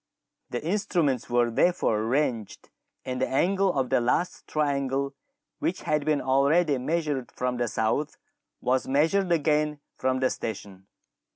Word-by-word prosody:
Theinstruments 155 - 0
were 120 -1 +2
therefore 115 -5 +2
arranged, 115 -2 -1 0.4
and 125 0 -3
the - - +1
angle 190 +7 +2
of 130 -2 0
the - - +3
last 125 +9 -1
triangle 140 -2 -1 0.5
which 185 - -2
had 150 -1 0
been 155 -2 +1
already 140 +3 +3
measured 150 -2 -2
from 125 0 -2
the 120 0 0
south 110 +7 -1 0.4
was 130 +1 +1
measured 165 +7 +2
again 150 -2 +1 0.2
from 130 0 0
the 130 -1 +2
station. 100 -3 -6
140 Hz, 130 wpm, -26 LUFS, 125-155 Hz, 0.5 s, the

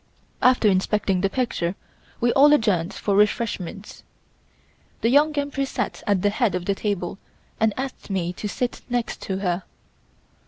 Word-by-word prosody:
After 250 -3 +4
inspecting 195 -1 +1
the 195 - +2
picture 200 -7 -1 0.4
we 240 0 +2
all 290 +2 +7
adjourned 200 - +2
for 200 - -1
refreshments. 210 -2 -1 1.0
The 230 - +2
Young 290 +4 +5
Empress 280 -1 -1
sat - - -3
at 200 -3 +2
the 205 - +3
head 215 -3 +1
of 180 -1 -3
the 200 - +1
table 195 -2 -3 0.4
and 220 0 +3
asked 265 -3 -5
me 180 -3 -1
to 210 - -5
sit 245 +4 -3
next 245 -1 -2
to 190 -2 -3
her. 175 +1 0
210 Hz, 155 wpm, -23 LUFS, 190-245 Hz, 1.0 s, all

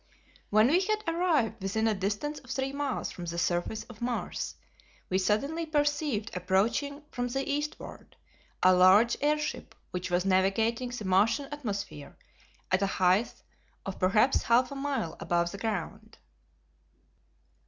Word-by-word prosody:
When 215 +1 +5
we 340 +5 +4
had 430 +2 -1
arrived 330 - +1
within 220 +4 0
a 220 - +3
distance 205 +10 -2
of - - -18
three 270 0 -2
miles 280 -2 -2
from 175 - -7
the 170 0 -4
surface 175 +5 -1
of 240 -3 -14
Mars 240 0 -3 0.6
we 185 - +2
suddenly 275 - 0
perceived 290 -8 -1
approaching 220 - 0
from 245 -1 -2
the 270 +2 -3
eastward 295 +1 -5 0.5
a 185 - +7
large 190 +6 +6
airship 300 +1 -1 0.2
which 180 0 -4
was 180 +1 +1
navigating 220 +6 +1
the 245 -4 -6
Martian 215 +9 +2
atmosphere 205 - -5 0.5
at 185 +1 +3
a 200 - +2
height 190 +3 +1 0.4
of 195 - -5
perhaps 210 +8 +3
half 245 +2 +3
a - - -5
mile 275 - -2
above 175 0 0
the 200 - -8
ground. 205 -7 -4
225 Hz, 145 wpm, -29 LUFS, 190-280 Hz, 0.6 s, a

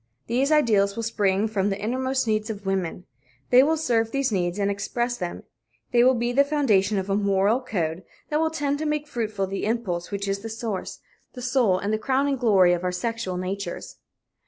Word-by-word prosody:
These 260 +5 +1
ideals 210 -9 +3
will 230 - -3
spring 205 -2 +1
from 205 -2 0
the 195 0 -3
innermost 260 +4 -1
needs 215 0 0
of 205 -2 -6
women. 185 -2 -2 0.5
They 250 +1 +8
will 315 +4 +2
serve 230 -7 +1
these 275 0 0
needs 175 -2 -1
and 200 0 +1
express 240 +5 -2
them. 180 -6 -5 0.5
They 240 -1 +5
will 260 +1 +5
be 240 0 0
the 275 +3 +4
foundation 220 -9 +2
of 190 0 -2
a 195 - +1
moral 200 +4 +2
code 175 -8 -2 0.3
that 300 - +2
will 320 0 +2
tend 290 -2 -1
to 310 - -2
make 300 0 -1
fruitful 215 -7 -2
the 195 +1 -4
impulse 200 -6 -2
which 200 0 -3
is 195 0 -1
the 225 +3 -7
source, 220 -3 -5 0.3
the 250 - -8
soul 245 -7 +2
and 200 +3 -2
the 215 - 0
crowning 270 +4 +1
glory 195 -7 +4
of 175 0 -2
our 180 - 0
sexual 190 0 -3
natures. 195 +2 -5
215 Hz, 205 wpm, -25 LUFS, 195-255 Hz, 0.5 s, They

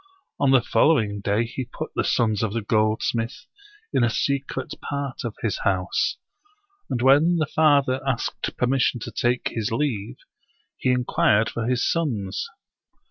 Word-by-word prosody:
On 140 - +3
the 135 -2 +5
following 110 -9 +2
day 105 +3 +1
he 125 +3 -5
put 120 - -7
the - - 0
sons 110 -4 +1
of 110 -3 -1
the 115 -2 -2
goldsmith 115 - 0 0.5
in 125 - +3
a 120 - +3
secret 135 +2 -2
part 140 -2 -4
of 115 -3 -4
his 110 -4 -1
house; 95 -2 0 0.7
and 120 - -1
when 145 +6 +5
the 160 -2 +1
father 140 -4 +3
asked 130 -3 -2
permission 125 0 +1
to - - -6
take 120 +1 0
his 110 -2 -3
leave 115 -3 -2 0.6
he - - -1
inquired 115 -3 +2
for 115 -1 -3
his 125 0 +1
sons. 115 - -2
120 Hz, 150 wpm, -24 LUFS, 110-135 Hz, 0.7 s, the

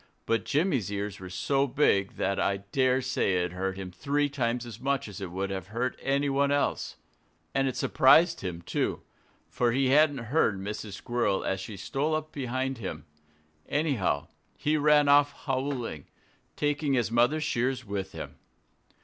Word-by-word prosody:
But 115 - 0
Jimmy's 140 - +1
ears 100 0 -4
were 95 -1 -8
so 135 +9 +1
big 120 -8 +2
that 100 +1 -1
I 100 - +1
dare 130 -1 +2
say 125 -7 +1
it 90 - -3
hurt 95 +1 -3
him 95 -2 -6
three 145 +10 0
times 125 -3 -1
as 115 -2 -9
much 135 0 -1
as 105 0 -9
it 95 - -4
would 95 +2 -3
have 95 -2 -4
hurt 120 +5 -2
anyone 140 0 +1
else. 145 0 0 0.6
And 135 0 +2
it 130 - -3
surprised 165 +6 +5
him, 85 -2 -5
too. - - -2 0.4
For 120 -1 +1
he 135 +1 +2
hadn't 145 +1 +5 0.2
heard 110 -11 +3
Mrs. 105 +1 -5
Squirrel 110 -2 -1
as 95 - -1
she 105 +1 -7
stole 140 - -1
up 155 0 -4
behind 130 -1 -2
him. 80 -7 -6 0.6
Anyhow, 135 - 0 0.3
he 150 +1 +1
ran 150 -1 +4
off 145 0 +5
howling, 130 - -2 0.5
taking 145 -1 0
his 120 -3 +1
mother's 125 +7 +3
shears 130 -2 -1
with 100 -2 -4
him. - - -8
125 Hz, 165 wpm, -28 LUFS, 100-140 Hz, 0.6 s, surprised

